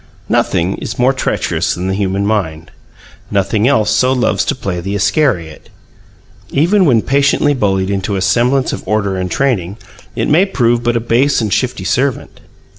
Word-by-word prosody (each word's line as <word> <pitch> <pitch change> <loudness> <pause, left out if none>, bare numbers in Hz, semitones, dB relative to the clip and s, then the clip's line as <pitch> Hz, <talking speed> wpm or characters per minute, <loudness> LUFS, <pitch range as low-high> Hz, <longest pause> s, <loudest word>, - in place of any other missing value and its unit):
Nothing 85 +3 0
is 115 - -6
more 125 +2 +3
treacherous 130 - -1
than 90 +1 -4
the 95 - -1
human 100 0 -1
mind; 80 -7 -2 0.6
nothing 105 +3 +1
else 110 -7 +2
so 130 0 +2
loves 110 -7 +1
to - - -1
play 95 -8 -4
the 100 +3 -4
Iscariot. 100 - -1 0.8
Even 180 +7 +2
when 120 -7 +3
patiently 140 +1 +2
bullied 95 -6 0
into 100 +1 -2
a 95 - -2
semblance 125 +5 +1
of - - -5
order 100 -2 0
and 95 -1 -3
training, 105 -5 -1 0.4
it - - -1
may 175 +7 +3
prove 120 -9 +1
but 120 0 0
a - - +1
base 120 +5 +1
and 110 -4 -1
shifty 125 -6 -1
servant. 130 +3 -1
110 Hz, 170 wpm, -15 LUFS, 95-130 Hz, 0.8 s, more